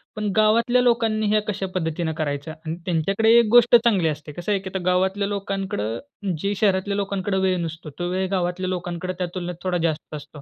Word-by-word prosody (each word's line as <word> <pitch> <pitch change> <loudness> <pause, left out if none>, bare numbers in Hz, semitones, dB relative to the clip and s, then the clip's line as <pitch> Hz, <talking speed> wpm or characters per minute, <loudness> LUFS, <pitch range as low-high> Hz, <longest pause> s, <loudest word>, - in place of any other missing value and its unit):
पण 210 -2 -2
गावातल्या 230 +3 +4
लोकांनी 225 -3 +2
हे 215 - +4
कशा 200 -2 -2
पद्धतीने 160 -1 -1
करायचं. 145 0 -3
आणि 160 +1 -3
त्यांच्याकडे 195 +6 +2
1 235 - +4
गोष्ट 240 0 +7
चांगली 225 -8 +4
असते. 150 -1 -4
कसं 175 +7 -4
आहे, 200 - +2
की 190 - -6
आता 190 - -1
गावातल्या 190 +2 +1
लोकांकडं, 195 - -3 0.4
जे 200 +5 -1
शहरातल्या 200 0 +1
लोकांकडे 195 -1 -1
वेळ 190 -1 +2
नसतो, 165 -1 -6
तो 175 - -1
वेळ 190 +1 0
गावातल्या 185 0 -1
लोकांकडे 180 0 -3
त्या 180 - 0
तुलनेत 180 -1 -4
थोडा 185 -1 0
जास्त 155 -1 -4
असतो. 145 0 -10
190 Hz, 190 wpm, -23 LUFS, 170-205 Hz, 0.4 s, गोष्ट